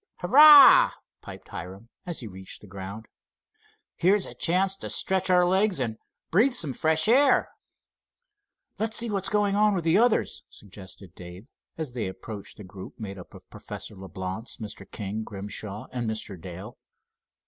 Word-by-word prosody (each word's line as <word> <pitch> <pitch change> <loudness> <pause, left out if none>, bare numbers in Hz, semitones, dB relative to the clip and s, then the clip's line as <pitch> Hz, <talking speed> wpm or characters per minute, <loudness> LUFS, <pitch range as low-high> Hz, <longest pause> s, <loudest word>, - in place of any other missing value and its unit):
"Hurrah!" 285 +7 +8 0.3
piped - - -12
Hiram, 95 +6 -9 0.2
as 175 -5 -4
he 115 - -7
reached 95 -1 -11
the 105 - -14
ground. 100 +3 -9 0.9
"Here's 190 +3 +2
a - - -10
chance 185 +3 0
to - - -7
stretch 190 0 0
our 180 -1 +4
legs 190 +1 +1
and 115 -4 -3 0.3
breathe 230 +10 +3
some 155 - -1
fresh 160 +5 +1
air." 270 +5 +4 1.3
"Let's 220 0 -1
see 235 -1 0
what 195 -2 -2
is - - +2
going 205 -1 +1
on 210 0 +3
with 175 - -2
the 165 +4 +3
others," 240 -1 +1
suggested 95 -2 -12
Dave, 90 +3 -12 0.3
and 160 -1 -3
they 120 -5 -3
approached 100 +2 -9
the 105 - -10
group 95 0 -11
made 100 -3 -7
up 90 - -13
of - - -15
Professor - - -8
Leblance, 95 +3 -7
Mr. 110 -3 -9
King, 105 0 -5
Grimshaw 105 +1 -7
and 120 -3 -3
Mr. 110 -2 -4
Dale. 95 +6 -10
115 Hz, 160 wpm, -26 LUFS, -, 1.3 s, Hurrah